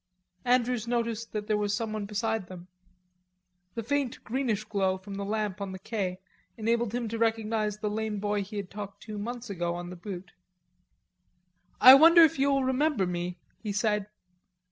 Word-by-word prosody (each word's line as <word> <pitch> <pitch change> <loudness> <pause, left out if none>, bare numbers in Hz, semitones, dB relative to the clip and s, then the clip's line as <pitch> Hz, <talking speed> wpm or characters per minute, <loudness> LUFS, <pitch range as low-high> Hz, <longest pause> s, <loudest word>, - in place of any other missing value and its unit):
Andrews 245 -2 +2
noticed 230 -1 -2
that 210 -1 -3
there 210 -1 +1
was 205 -1 0
someone 215 -2 -3
beside 215 -1 -2
them. 180 0 -11 1.1
The 230 - -3
faint, 275 +1 -1
greenish 230 -3 -1
glow 195 -3 0
from 195 +2 -10
the 200 0 -4
lamp 210 -1 -2
on 195 -1 -4
the - - -6
quai 195 -4 -3 0.4
enabled 230 0 0
him 245 -2 -2
to 225 +1 -4
recognize 220 -2 0
the 210 0 -3
lame 215 0 -2
boy 205 0 0
he 205 +2 -7
had 200 -2 -5
talked 200 -1 -8
to 210 -1 -6
months 240 +1 -5
ago 175 -2 -2
on 175 0 -6
the - - -7
Butte. 180 0 -8 1.5
"I 255 - +11
wonder 330 +4 +9
if 310 -4 +3
you'll 275 0 +3
remember 260 -4 +1
me," 175 0 -3 0.2
he 215 - -4
said. 210 -1 0
215 Hz, 170 wpm, -28 LUFS, 200-235 Hz, 1.5 s, I